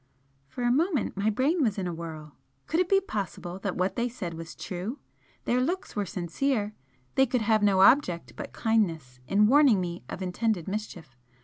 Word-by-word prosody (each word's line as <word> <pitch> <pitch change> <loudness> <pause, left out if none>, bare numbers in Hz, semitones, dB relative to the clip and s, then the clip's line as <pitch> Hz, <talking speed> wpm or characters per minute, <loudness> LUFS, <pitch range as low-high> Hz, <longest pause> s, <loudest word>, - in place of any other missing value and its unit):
For 245 - -6
a 240 - +3
moment 310 - +1
my 200 +2 +1
brain 280 - +1
was 220 -7 +1
in 190 - -2
a 175 - -2
whirl. 160 -3 -8 0.3
Could 325 - 0
it 365 -1 +1
be 390 - +5
possible 195 - -5
that 195 -1 -3
what 185 +1 0
they 240 +1 0
said 200 -8 -5
was 165 0 -8
true? 190 +9 -5 0.5
Their 250 +1 +2
looks 355 +8 -2
were 205 -2 -1
sincere, 210 +6 -1 0.4
they 265 0 +4
could 250 0 0
have 215 0 +3
no 200 -2 +4
object 190 -6 +4
but - - -7
kindness 165 - 0
in 205 +2 +4
warning 265 -3 +5
me 175 -1 -4
of 190 - -5
intended 185 -1 -1
mischief. 190 -9 -6
205 Hz, 190 wpm, -28 LUFS, 175-250 Hz, 0.5 s, be